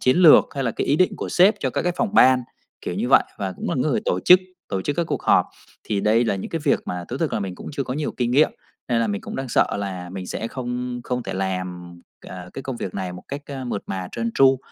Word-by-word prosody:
chiến 130 - +3
lược 175 -4 +8
hay 135 -1 -2
là 120 - +1
cái - - -3
ý 145 - +3
định 185 +2 +2
của - - -4
sếp 195 +5 +5
cho 130 - 0
các - - -1
cái 175 - 0
phòng 215 -3 -1
ban, 130 - +6 0.4
kiểu - - -4
như - - -1
vậy, - - +6 0.2
và 95 -2 -2
cũng - - -6
là - - 0
cái - - +1
người - - +1
tổ 90 - 0
chức, 180 - +7 0.3
tổ 95 - -2
chức 145 +6 -2
các 170 - +1
cuộc - - -3
họp. - - +4 0.4
Thì 105 -2 -1
đây 110 +4 +3
là 105 - 0
những 95 - -6
cái 165 - -2
việc 145 - +3
mà 90 -1 -4
thú 125 - -4
thực 160 +2 -1
là - - -1
mình 95 -2 -4
cũng - - -9
chưa 140 -1 -2
có 130 - -4
nhiều 150 +1 -2
kinh 120 -1 0
nghiệm 145 +5 +4 0.4
nên 120 -2 +2
là 115 - +1
mình 100 -2 -2
cũng - - -7
đang 135 -1 -4
sợ - - +2
là 95 -3 -5
mình 95 0 -6
sẽ 115 - -4
không 125 -1 -4
không 125 0 -2
thể - - -5
làm, 90 -2 -4 0.3
à, 90 -1 -8
cái 135 - -6
công 130 -2 -5
việc 95 - -5
này 95 -2 -3
một 90 - -9
cách, 140 +1 -5
a, 135 -2 -6
mượt 120 -5 -3
mà, 95 -1 -4
trơn 115 0 -2
tru. 135 -1 +5
120 Hz, 290 wpm, -23 LUFS, 95-135 Hz, 0.4 s, lược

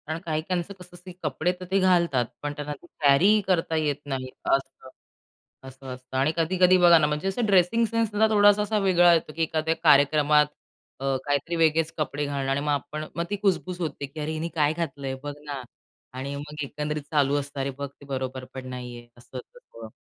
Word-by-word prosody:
कारण 160 +1 -3
काही-काहीचं 170 +4 -2
कसं 180 -2 -14
असतं 180 +1 -11
की 175 - -17
कपडे 160 +3 0
तर 185 - -7
ते 195 - +3
घालतात. 170 -9 +3 0.2
पण 145 0 -3
त्यांना 150 0 -5
ते - - -16 0.2
कॅरीही 185 +10 +5
करता 165 -3 +1
येत 150 -2 +1
नाही 130 -2 -4 0.2
असं. 135 -1 -1 0.8
असं 130 +1 -12
असतं 130 +1 -7
आणि 135 +4 +2
कधी-कधी 180 +2 +4
बघा 175 -1 +7
ना 150 - +2
म्हणजे 150 +5 -2
असा 195 +5 -1
ड्रेसिंग 200 +4 +3
सेन्स 230 0 0
सुद्धा 215 +1 +3
थोडासा 205 -1 +5
असा 210 +1 0
वेगळा 175 -2 +5
येतो 160 -2 0
की 165 - -3
एखाद्या 160 0 0
कार्यक्रमात 150 0 +5 0.5
अ, 135 - -5 0.2
काहीतरी 145 +4 -1
वेगळेच 165 0 +2
कपडे 145 -1 -2
घालणं 140 -1 -3
आणि 135 - +1
मग 150 0 -1
आपण 150 +2 -3
मग 170 - -1
ती 205 - -1
कुजबुज 185 -2 0
होते 155 -3 -3
की 140 +3 -11
अरे, 150 +1 -3
हिने 160 +1 -3
काय 150 -1 +2
घातलंय 140 -5 -4
बघ 145 0 -4
ना 140 -2 -5 0.6
आणि 140 +2 -4
मग 150 +1 -6
एकंदरीत 150 +2 -4
चालू 145 -2 +2
असतं. 140 0 -7
अरे, 135 0 -1
बघ 140 0 -4
ते - - -12
बरोबरपण 130 -1 -5
नाही 125 -1 -7
आहे 120 0 -13
असं 120 +2 -11
सगळं 115 - -13
150 Hz, 200 wpm, -25 LUFS, 140-175 Hz, 0.8 s, बघा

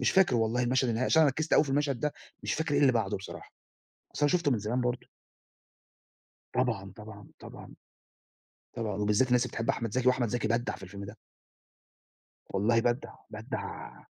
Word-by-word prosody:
مش - - +3
فاكر 190 -8 +4
والله 115 +2 +1
المشهد 130 +1 +2
النهائي 115 +3 0
عشان 160 - +5
أنا 150 - +5
ركِّزت 155 +4 -3
أوي 155 - +6
في 140 - -5
المشهد 140 -3 0
ده، 150 -1 0 0.3
مش - - -1
فاكر 155 -2 -1
إيه 145 - +3
اللي 135 -3 +5
بعده 110 -3 0
بصراحة. 95 - -10 0.6
أصل 145 - +2
أنا 145 - +2
شُفته 170 -5 +2
من 120 - +1
زمان 115 +5 -1
برضه. 120 0 -2 1.5
طبعًا، 115 -7 -1
طبعًا، 105 -1 -11
طبعًا. - - -11 1.0
طبعًا. 110 -4 -3
وبالذات 105 +5 +2
الناس 125 0 +3
اللي - - -7
بتحب 115 - -3
أحمد 115 -3 0
زكي 130 0 +1
وأحمد 125 -2 +3
زكي 120 +1 -1
بدَّع 120 +1 0
في - - -13
الفيلم 100 +1 -8
ده. 100 - -10 1.3
والله 115 +4 +2
بدَّع، 120 +1 -1 0.2
بدَّع - - -6
120 Hz, 180 wpm, -29 LUFS, 110-130 Hz, 1.5 s, أوي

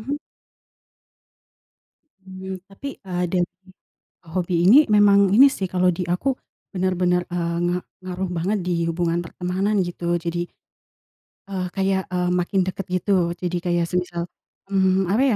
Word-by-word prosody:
mhm. - - -6 2.0
Hmm, 190 0 -8
tapi, 275 +8 -8
eee, 180 -2 -2
dari 180 -2 +1 0.9
hobi 180 0 -1
ini 240 +10 +9
memang 200 -1 +5
ini 265 +6 +9
sih, 190 -6 -3
kalau 180 0 +2
di 175 - -3
aku 180 +10 0 0.4
bener-bener, 180 -2 +1
eee, 170 -1 -1
nga 175 - +1 0.3
ngaruh 185 0 -3
banget 190 +6 0
di 180 - 0 0.2
hubungan 170 0 0
pertemanan, 185 +5 -1
gitu. 175 0 -2
Jadi, 175 +1 -1 1.1
eee, 190 -2 -3
kayak, 190 0 +1
eee, 180 -1 0
makin 180 +2 +1
dekat, 185 0 -4
gitu. 185 +3 0 0.3
Jadi 180 0 -2
kayak 175 -1 +1
semisal, 180 -1 -1 0.5
mmm, 190 -1 +3
apa 235 - +3
185 Hz, 135 wpm, -23 LUFS, 175-195 Hz, 2.0 s, ini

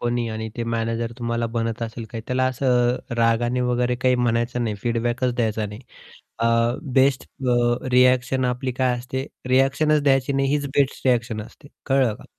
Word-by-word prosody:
कोणी 120 -1 -1
आणि 110 0 -4
ते 120 - -2
मॅनेजर 115 +1 -2
तुम्हाला 115 -1 -1
बनत 115 0 -2
असेल 115 0 -5
काही 115 -2 -6
त्याला 130 0 +1
असं 125 -1 +2 0.2
रागाने 120 +2 +2
वगैरे 125 0 +1
काही 130 0 +4
म्हणायचं 120 0 0
नाही, 110 -2 -1
फीडबॅकच 120 +1 0
द्यायचा 110 -2 -1
नाही. 105 +2 -9 0.6
अ, 115 - +1 0.5
बेस्ट 135 0 +3 0.3
अ, 120 +1 +1
रिएक्शन 125 +1 +3
आपली 125 +1 -1
काय 125 0 +1
असते 130 +3 -4 0.2
रिएक्शन 135 +4 +3
द्यायची 135 -1 +2
नाही 135 0 +1
हीच 145 0 0
बेस्ट 140 -1 +1
रिएक्शन 120 -3 +1
असते. 140 +6 -15 0.2
कळलं 135 -5 +2
का? - - -15
125 Hz, 165 wpm, -23 LUFS, 115-130 Hz, 0.6 s, काही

